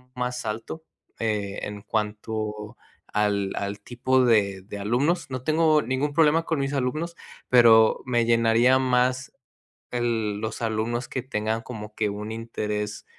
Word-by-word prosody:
más 125 Hz, -1 st, -3 dB
alto, 115 Hz, +9 st, -5 dB, 0.4 s
eh, 105 Hz, -3 st, -2 dB
en 105 Hz, 0 st, -5 dB
cuanto 105 Hz, 0 st, -3 dB, 0.4 s
al 100 Hz, -2 st, +1 dB
al 100 Hz, +1 st, -3 dB
tipo 125 Hz, +3 st, +1 dB
de 100 Hz, -5 st, +2 dB
de 105 Hz, +1 st, -8 dB
alumnos, 135 Hz, -, 0 dB
no 130 Hz, -1 st, -3 dB
tengo 155 Hz, +1 st, +3 dB
ningún 130 Hz, +4 st, -1 dB
problema 160 Hz, +1 st, +4 dB
con 160 Hz, -3 st, -1 dB
mis 135 Hz, +1 st, -1 dB
alumnos, 155 Hz, +6 st, -2 dB, 0.3 s
pero 115 Hz, -3 st, +6 dB
me 120 Hz, -2 st, +1 dB
llenaría 115 Hz, +2 st, +4 dB
más 125 Hz, 0 st, +1 dB, 0.6 s
el 115 Hz, -4 st, -1 dB
los 110 Hz, +1 st, -4 dB
alumnos 115 Hz, +2 st, -1 dB
que 130 Hz, -, -4 dB
tengan 110 Hz, -2 st, -2 dB
como 105 Hz, -3 st, -8 dB
que 105 Hz, -2 st, 0 dB
un 105 Hz, +2 st, -5 dB
interés 105 Hz, -2 st, -4 dB
115 Hz, 140 wpm, -25 LUFS, 105-130 Hz, 0.6 s, pero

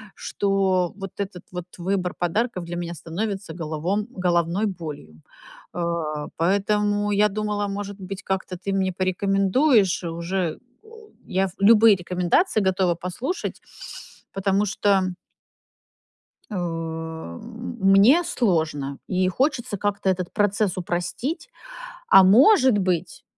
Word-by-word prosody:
что 190 Hz, -3 st, 0 dB
вот 195 Hz, -2 st, -6 dB
этот 190 Hz, -3 st, -5 dB
вот 180 Hz, -1 st, -5 dB
выбор 185 Hz, 0 st, -1 dB
подарков 185 Hz, +2 st, -1 dB
для 175 Hz, +1 st, -6 dB
меня 170 Hz, 0 st, -4 dB
становится 195 Hz, +2 st, -4 dB
головом 170 Hz, +6 st, -2 dB
головной 175 Hz, +2 st, +1 dB
болью. 150 Hz, -, -7 dB, 0.5 s
Э, 165 Hz, -4 st, -2 dB
поэтому 205 Hz, +3 st, +1 dB
я 210 Hz, +1 st, +4 dB
думала, 205 Hz, 0 st, -2 dB
может 200 Hz, 0 st, -5 dB
быть, 190 Hz, +1 st, -7 dB
как-то 190 Hz, -1 st, -3 dB
ты 195 Hz, +2 st, -4 dB
мне 190 Hz, -1 st, +1 dB
порекомендуешь. 195 Hz, -, +2 dB
Уже, 170 Hz, +1 st, -2 dB, 0.3 s
э, -, -, -21 dB, 0.4 s
я 190 Hz, +1 st, +1 dB
ф 185 Hz, -, -5 dB
любые 215 Hz, +1 st, +7 dB
рекомендации 180 Hz, -, +1 dB
готова 185 Hz, -2 st, +1 dB
послушать. 185 Hz, -, -4 dB, 0.7 s
Потому 195 Hz, +1 st, +1 dB
что 200 Hz, -1 st, +2 dB, 1.5 s
У, -, -, -5 dB
мне 180 Hz, -, +1 dB
сложно, 155 Hz, -, -1 dB
и 185 Hz, 0 st, +1 dB
хочется 250 Hz, -1 st, -1 dB
как-то 200 Hz, 0 st, -1 dB
этот 180 Hz, -1 st, -2 dB
процесс 205 Hz, -2 st, +1 dB
упростить. 180 Hz, -, -3 dB, 0.6 s
А, 195 Hz, -, +8 dB
может 255 Hz, -, +6 dB
быть, 180 Hz, -3 st, -2 dB
190 Hz, 115 wpm, -23 LUFS, 175-205 Hz, 1.5 s, А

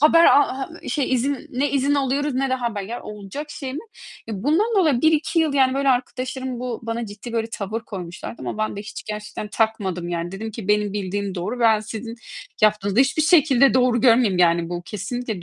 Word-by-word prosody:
Haber 330 Hz, +3 st, +6 dB
ha 275 Hz, -2 st, +4 dB
ha 270 Hz, -, -4 dB
ııı, 330 Hz, -, -8 dB
şey, 275 Hz, -3 st, 0 dB
izin, 265 Hz, +2 st, 0 dB
ne 270 Hz, +3 st, 0 dB
izin 280 Hz, +1 st, +2 dB
alıyoruz 280 Hz, 0 st, 0 dB
ne 270 Hz, 0 st, 0 dB
de 260 Hz, -, +3 dB
haber. 235 Hz, -5 st, -3 dB
Ya, 230 Hz, +5 st, -6 dB
olacak 210 Hz, +9 st, -7 dB
şey 270 Hz, -3 st, -6 dB
mi? -, -, -3 dB, 0.5 s
E, 205 Hz, -3 st, -5 dB
bundan 320 Hz, +10 st, +3 dB
dolayı 305 Hz, -10 st, +3 dB
1-2 315 Hz, +1 st, +2 dB
yıl, 305 Hz, -3 st, +1 dB
yani, 265 Hz, -1 st, +3 dB
böyle, 275 Hz, 0 st, +1 dB
arkadaşlarım 255 Hz, 0 st, -2 dB
bu 250 Hz, -2 st, -4 dB
bana 230 Hz, 0 st, -3 dB
ciddi 210 Hz, +4 st, -9 dB
böyle 225 Hz, -1 st, 0 dB
tavır 215 Hz, +1 st, -4 dB
koymuşlardı 190 Hz, -1 st, -7 dB
ama -, -, -4 dB
ben 215 Hz, -1 st, -1 dB
de -, -, -4 dB
hiç 210 Hz, +3 st, -8 dB
gerçekten 210 Hz, 0 st, -6 dB
takmadım 205 Hz, -5 st, -1 dB
yani. 175 Hz, +1 st, -3 dB
Dedim 220 Hz, +3 st, -5 dB
ki 210 Hz, -2 st, -8 dB
"Benim 210 Hz, -1 st, +2 dB
bildiğim 200 Hz, -1 st, -3 dB
doğru, 190 Hz, +8 st, -4 dB
ben 220 Hz, -2 st, +4 dB
sizin 220 Hz, +2 st, -6 dB, 0.5 s
yaptığınızı 210 Hz, -1 st, +2 dB
da -, -, +7 dB
hiçbir 275 Hz, +3 st, +2 dB
şekilde 280 Hz, -5 st, +5 dB
doğru 250 Hz, -2 st, +3 dB
görmüyorum, 230 Hz, -5 st, +4 dB
yani 170 Hz, -1 st, +3 dB
bu 175 Hz, 0 st, -4 dB
kesinlikle 215 Hz, +1 st, -5 dB
235 Hz, 205 wpm, -22 LUFS, 205-270 Hz, 0.5 s, da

